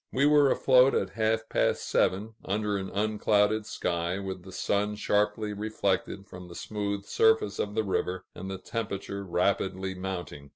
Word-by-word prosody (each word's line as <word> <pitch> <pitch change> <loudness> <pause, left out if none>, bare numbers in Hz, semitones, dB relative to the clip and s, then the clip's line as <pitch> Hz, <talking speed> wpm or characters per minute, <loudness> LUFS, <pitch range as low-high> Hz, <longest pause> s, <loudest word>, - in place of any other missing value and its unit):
We 135 +2 +2
were 145 -1 +6
afloat 130 0 +5
at - - 0
half 110 +1 0
past - - 0
seven, 105 +4 +1
under 105 +1 -1
an 95 -1 -3
unclouded 105 0 +1
sky, 85 +1 -1
with 95 -2 -5
the 95 +2 -12
sun 105 +2 0
sharply 105 0 0
reflected 100 -2 -2
from 90 -2 -10
the 85 - -11
smooth 100 0 -3
surface 110 -1 +2
of 105 0 -2
the 110 - +2
river, 95 -2 -2
and 95 +2 -7
the 95 - -4
temperature 100 -1 -4
rapidly 95 +1 0
mounting. 90 -6 -6
100 Hz, 160 wpm, -28 LUFS, 95-110 Hz, -, were